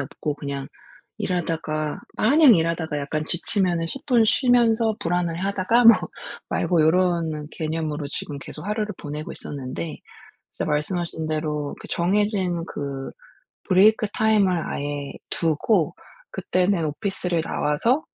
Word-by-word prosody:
없고 145 Hz, +2 st, -4 dB
그냥 140 Hz, -2 st, -5 dB, 0.5 s
일하다가 160 Hz, -4 st, -2 dB, 0.2 s
마냥 280 Hz, +2 st, +6 dB
일하다가 165 Hz, -3 st, 0 dB
약간 150 Hz, +2 st, -2 dB
지치면은 175 Hz, -2 st, 0 dB
10 275 Hz, -, -7 dB
분 240 Hz, -5 st, +4 dB
쉬면서 230 Hz, -2 st, +3 dB
불안해하다가 185 Hz, +6 st, +1 dB
뭐 230 Hz, -1 st, +10 dB, 0.5 s
말고 170 Hz, -3 st, +2 dB
요런 165 Hz, -2 st, +2 dB
개념으로 155 Hz, -2 st, -3 dB
지금 145 Hz, 0 st, -5 dB
계속 140 Hz, -, -8 dB
하루를 210 Hz, 0 st, -2 dB
보내고 150 Hz, +1 st, -6 dB
있었는데 140 Hz, +3 st, -6 dB, 0.6 s
진짜 -, -, -3 dB
말씀하신 160 Hz, +2 st, -2 dB
대로 150 Hz, -2 st, -2 dB
그 -, -, -9 dB
정해진 185 Hz, -1 st, +1 dB
그 140 Hz, -4 st, -5 dB, 0.6 s
브레이크 210 Hz, +3 st, +5 dB
타임을 215 Hz, -3 st, +3 dB, 0.2 s
아예 145 Hz, -1 st, -4 dB, 0.2 s
두고 165 Hz, +1 st, +1 dB, 0.4 s
그때는 180 Hz, -2 st, +1 dB
오피스를 180 Hz, +1 st, -1 dB
나와서 230 Hz, -, +1 dB
170 Hz, 285 characters per minute, -23 LUFS, 150-205 Hz, 0.6 s, 뭐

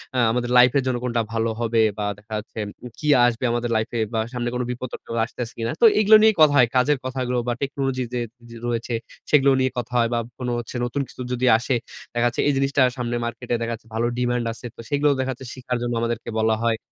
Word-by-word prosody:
আ -, -, 0 dB
আমাদের 120 Hz, 0 st, -1 dB
লাইফ 125 Hz, 0 st, +7 dB
এর 135 Hz, -, +2 dB
জন্য 125 Hz, -, +1 dB
কোনটা 120 Hz, -2 st, 0 dB
ভালো 115 Hz, 0 st, 0 dB
হবে, 115 Hz, -1 st, +2 dB, 0.2 s
বা 105 Hz, -, -2 dB
দেখা 110 Hz, +1 st, -11 dB
যাচ্ছে, 110 Hz, +1 st, -8 dB, 0.3 s
উ -, -, -5 dB
কি 150 Hz, -, -4 dB, 0.2 s
আসবে 120 Hz, +1 st, 0 dB
আমাদের 120 Hz, 0 st, -1 dB
লাইফ 110 Hz, +1 st, 0 dB
এ, -, -, 0 dB
বা 110 Hz, -, +1 dB
সামনে 120 Hz, -1 st, -2 dB
কোন 125 Hz, -, -1 dB
বিপদ-টিপদ 125 Hz, -1 st, -6 dB
আসতেছে 120 Hz, 0 st, -6 dB
কিনা? 115 Hz, 0 st, -2 dB
তো -, -, +7 dB
এগুলো 215 Hz, +1 st, +7 dB
নিয়েই 220 Hz, -1 st, +5 dB
কথা 150 Hz, -2 st, +7 dB
হয়। 125 Hz, -2 st, +6 dB
কাজের 135 Hz, +3 st, +3 dB
কথাগুলো, 125 Hz, -1 st, -2 dB
বা 120 Hz, -, +1 dB
টেকনোলজি 135 Hz, -2 st, -1 dB
যে 125 Hz, -, 0 dB, 0.3 s
যে 115 Hz, -, -11 dB
রয়েছে, 120 Hz, 0 st, -2 dB, 0.4 s
সেগুলো 140 Hz, -2 st, +5 dB
নিয়ে 130 Hz, 0 st, +1 dB
কথা 120 Hz, 0 st, -4 dB
হয়, 115 Hz, -1 st, +3 dB
বা 120 Hz, -, +1 dB, 0.2 s
কোনো 125 Hz, -1 st, -2 dB
হচ্ছে 120 Hz, -, -8 dB
নতুন 140 Hz, +4 st, -2 dB
কিছু -, -, -11 dB
যদি 125 Hz, +1 st, 0 dB
আসে, 125 Hz, +2 st, -1 dB, 0.4 s
দেখা 120 Hz, 0 st, +1 dB
যাচ্ছে 120 Hz, -, -1 dB
এই 145 Hz, -, +3 dB
জিনিসটা 135 Hz, 0 st, +1 dB, 0.2 s
সামনে 120 Hz, -1 st, -2 dB
মার্কেটে, 120 Hz, +1 st, -4 dB
দেখা 115 Hz, 0 st, -2 dB
যাচ্ছে 115 Hz, 0 st, -10 dB
ভালো 120 Hz, +1 st, +1 dB
ডিমান্ড 120 Hz, -1 st, 0 dB
আছে। 120 Hz, -, -12 dB
তো -, -, -22 dB
সেগুলোও 145 Hz, 0 st, +2 dB
দেখা 130 Hz, 0 st, 0 dB
যাচ্ছে 130 Hz, +1 st, -8 dB
শিখার 125 Hz, -1 st, -3 dB
জন্য 120 Hz, 0 st, -2 dB
আমাদেরকে 115 Hz, -1 st, -2 dB
বলা 110 Hz, 0 st, +3 dB
হয়। 115 Hz, -1 st, +2 dB
120 Hz, 235 wpm, -23 LUFS, 115-130 Hz, 0.4 s, লাইফ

